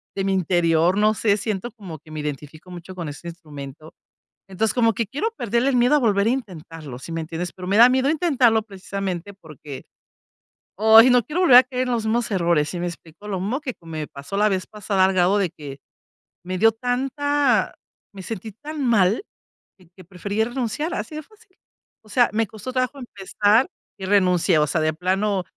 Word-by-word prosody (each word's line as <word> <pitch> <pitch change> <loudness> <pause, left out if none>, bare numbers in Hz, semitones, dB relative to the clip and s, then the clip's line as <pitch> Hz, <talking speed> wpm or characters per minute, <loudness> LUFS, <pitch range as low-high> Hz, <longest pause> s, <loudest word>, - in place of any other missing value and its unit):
de 195 - -2
mi 195 - 0
interior 175 -1 +2
no 215 +1 +3
sé 205 -1 +1
siento 210 +2 -4
como 185 -9 -10
que 155 - -20
me 155 -1 -5
identifico 150 +4 -7
mucho 180 +1 -10
con 170 -4 -5
este 145 +4 -9
instrumento. 155 -3 -10 0.5
Entonces 195 +3 -1
como 230 -2 +3
que 225 +1 -2
quiero 295 - -2
perder 235 +2 0
el 275 -1 +2
miedo 245 +4 +4
a - - +5
volver 205 -4 +2
a - - +3
intentarlo, 165 - -6
¿si 165 - -9
me 165 0 -3
entiendes? 165 +2 -5
Pero 180 -1 -8
me 200 +3 +1
da 240 +2 +9
miedo 260 +2 +2
intentarlo 265 -9 +3
precisamente 195 -2 -5
porque, 150 -6 -11 0.9
ay, 220 +3 +7
no 245 -2 +4
quiero 340 +5 -2
volver 260 -9 +8
a 255 - +9
caer 255 0 -3
en - - -1
los 225 -2 -2
mismos 225 0 0
errores. 170 -5 +1
¿Si 175 - -5
me 175 - -2
explico? 170 +4 -11
Lo 190 -3 -3
mismo 235 +9 -2
que 255 -5 -4
me 160 -2 -6
pasó 140 +7 -8
la 210 +1 +4
vez 185 -1 -2
pasada, 205 -2 -1
al 190 - +2
grado 185 +2 +3
de 190 -4 +1
que 145 -4 -10 0.7
me 185 0 -3
dio 225 +3 +5
tanta 270 +4 0 0.4
me 195 - -9
sentí 220 +2 -6
tan 300 +6 -7
mal 215 - +2 0.7
que 185 - -14
prefería 200 +4 -3
renunciar 260 +7 -3
así 305 - -5
de 310 - -5
fácil. 425 0 -25 0.5
O 215 - -20
sea, 245 +1 +3
me 225 +1 +1
costó 220 +5 -8
trabajo 255 +2 -1
empezar 210 +1 +1 0.3
y 190 - -5
renuncié. 180 -4 +3
O 150 - +2
sea, 160 - 0
de 155 0 +1
plano, 190 +3 0
200 Hz, 200 wpm, -22 LUFS, 175-240 Hz, 0.9 s, da